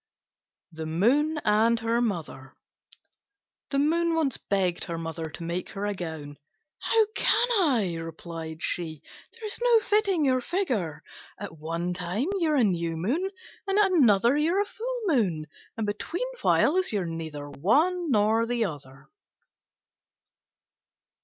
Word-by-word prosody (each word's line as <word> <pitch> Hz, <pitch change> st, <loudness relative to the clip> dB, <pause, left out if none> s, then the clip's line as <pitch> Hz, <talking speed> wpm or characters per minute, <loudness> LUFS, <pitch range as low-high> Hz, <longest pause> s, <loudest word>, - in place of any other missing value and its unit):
THE 160 Hz, -1 st, -6 dB
MOON 265 Hz, -, +2 dB
AND 225 Hz, +2 st, +3 dB
HER 230 Hz, +1 st, +1 dB
MOTHER 160 Hz, -, -4 dB, 1.1 s
The 275 Hz, -, -1 dB
Moon 330 Hz, +3 st, +2 dB
once 300 Hz, -6 st, +1 dB
begged 185 Hz, -3 st, -1 dB
her 170 Hz, -2 st, -4 dB
Mother 165 Hz, -1 st, -5 dB
to 160 Hz, +2 st, -9 dB
make 170 Hz, +2 st, -3 dB
her 200 Hz, 0 st, -4 dB
a 205 Hz, -, -1 dB
gown. 160 Hz, -6 st, -7 dB, 0.4 s
"How 445 Hz, -1 st, +3 dB
can 485 Hz, -, +3 dB
I?" 240 Hz, -, +2 dB
replied 165 Hz, -1 st, -7 dB
she; 160 Hz, -3 st, -2 dB, 0.4 s
"there's 430 Hz, -2 st, 0 dB
no 475 Hz, -2 st, +6 dB
fitting 400 Hz, -6 st, +2 dB
your 255 Hz, -1 st, +2 dB
figure. 230 Hz, -, -2 dB, 0.3 s
At 160 Hz, -, -8 dB
one 165 Hz, +3 st, -3 dB
time 180 Hz, +7 st, -2 dB
you're 315 Hz, -3 st, +2 dB
a 265 Hz, -, +4 dB
New 170 Hz, -5 st, 0 dB
Moon, 275 Hz, -, -1 dB, 0.4 s
and 390 Hz, +1 st, +1 dB
at 405 Hz, -2 st, +4 dB
another 235 Hz, -, +4 dB
you're 330 Hz, +7 st, +2 dB
a -, -, 0 dB
Full 485 Hz, +4 st, -5 dB
Moon; 200 Hz, -, +1 dB, 0.3 s
and 220 Hz, -, -1 dB
between 215 Hz, -, -3 dB, 0.2 s
whiles 370 Hz, +4 st, +3 dB
you're 200 Hz, -4 st, -1 dB
neither 160 Hz, -3 st, -6 dB
one 315 Hz, -, +2 dB
nor 220 Hz, 0 st, +3 dB
the 240 Hz, -1 st, 0 dB
other." 140 Hz, -6 st, -8 dB
210 Hz, 140 wpm, -27 LUFS, -, 1.1 s, no